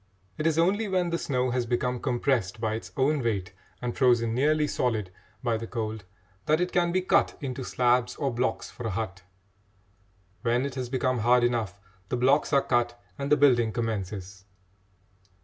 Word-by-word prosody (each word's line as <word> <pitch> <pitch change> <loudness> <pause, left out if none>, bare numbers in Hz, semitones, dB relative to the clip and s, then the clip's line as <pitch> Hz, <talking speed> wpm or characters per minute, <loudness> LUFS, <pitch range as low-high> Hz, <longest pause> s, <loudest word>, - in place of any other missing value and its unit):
It 155 - -1
is 160 -1 +1
only 200 +6 +2
when 180 -3 0
the 170 - 0
snow 125 -2 0
has 125 -1 -1
become 125 +1 0
compressed 120 -6 0
by 110 -1 -1
its 110 - -6
own 140 +2 +2
weight 100 -6 -2 0.3
and 120 -1 -2
frozen 120 -3 +3
nearly 150 +4 +2
solid 110 -9 -1 0.3
by 120 -2 +1
the 115 +1 -6
cold 110 -3 -4 0.4
that 155 +1 +3
it 180 0 0
can 175 -1 +2
be 185 +1 +1
cut - - +2
into 130 -1 -4
slabs 125 0 +1
or 140 -4 -1
blocks 125 +2 -1
for 120 - -6
a 100 -3 -3
hut. 95 -4 -4 1.2
When 120 +2 +1
it 140 - -4
has 130 -2 -4
become 130 -1 0
hard 120 +2 +4
enough, 115 -5 0 0.3
the 125 - 0
blocks 135 +4 +3
are 140 -2 +4
cut 120 -1 0 0.2
and 140 +1 -3
the 150 - +6
building 120 -6 +4
commences. 100 -4 -4
125 Hz, 180 wpm, -27 LUFS, 115-140 Hz, 1.2 s, the